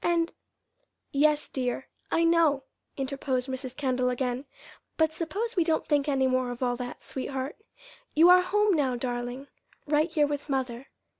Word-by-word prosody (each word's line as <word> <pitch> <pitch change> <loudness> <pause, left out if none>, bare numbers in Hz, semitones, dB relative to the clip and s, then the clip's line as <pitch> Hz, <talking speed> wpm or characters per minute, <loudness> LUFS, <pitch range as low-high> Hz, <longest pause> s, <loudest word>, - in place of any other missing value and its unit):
And 340 -1 +1 0.4
" - - -44 0.2
"Yes, 295 +1 +3
dear, 255 0 -3 0.2
I 330 - +3
know," 330 -5 +4 0.3
interposed 265 -1 -2
Mrs. 260 -1 -5
Kendall 255 -3 +1
again; 250 +1 -2 0.5
"but 320 -1 +3
suppose 400 +9 -3
we 350 - +4
don't 320 -1 +1
think 295 -1 +2
any 270 -2 +2
more 255 -1 +1
of 245 +1 -4
all 245 -1 +1
that, 245 0 -6
sweetheart. 265 +1 -4 0.6
You 325 +3 +7
are 360 0 +8
home 410 +2 +2
now, 270 -5 +1
darling, 245 +2 -3 0.4
right 305 +2 +2
here 310 -3 +3
with 290 0 -4
mother. 260 -1 -2
275 Hz, 160 wpm, -28 LUFS, 255-320 Hz, 0.6 s, are